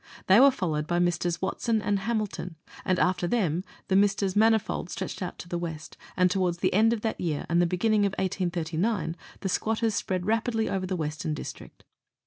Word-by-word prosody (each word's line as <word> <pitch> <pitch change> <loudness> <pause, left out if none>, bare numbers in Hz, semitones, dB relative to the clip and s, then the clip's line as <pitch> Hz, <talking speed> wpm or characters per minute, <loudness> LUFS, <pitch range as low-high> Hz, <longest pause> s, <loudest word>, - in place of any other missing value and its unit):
They 190 +4 +6
were 275 +2 +8
followed 160 - -2
by 175 - 0
Messrs. 175 0 0
Watson 220 +4 0
and 205 -2 0
Hamilton, 210 -5 -3 0.3
and 185 - +1
after 180 -1 +1
them 180 -6 0 0.2
the 190 - +1
Messrs. 200 -1 +2
Manifold 220 -4 +2
stretched - - -5
out 180 - -4
to - - -9
the 175 0 -3
west, 160 -3 -6 0.2
and 180 -1 +4
towards 180 -2 0
the - - 0
end 220 +4 +4
of 230 -2 -1
that 225 - -2
year 155 -5 -2
and 170 +1 +3
the 175 - +3
beginning 205 +3 +2
of 195 - -5
1839 175 -1 -1 0.3
the 195 - -2
squatters 225 +3 0
spread 185 -2 -2
rapidly 225 +1 0
over 190 -1 -2
the 185 - -2
Western 155 -1 -3
District. - - -9
185 Hz, 190 wpm, -27 LUFS, 175-215 Hz, 0.3 s, were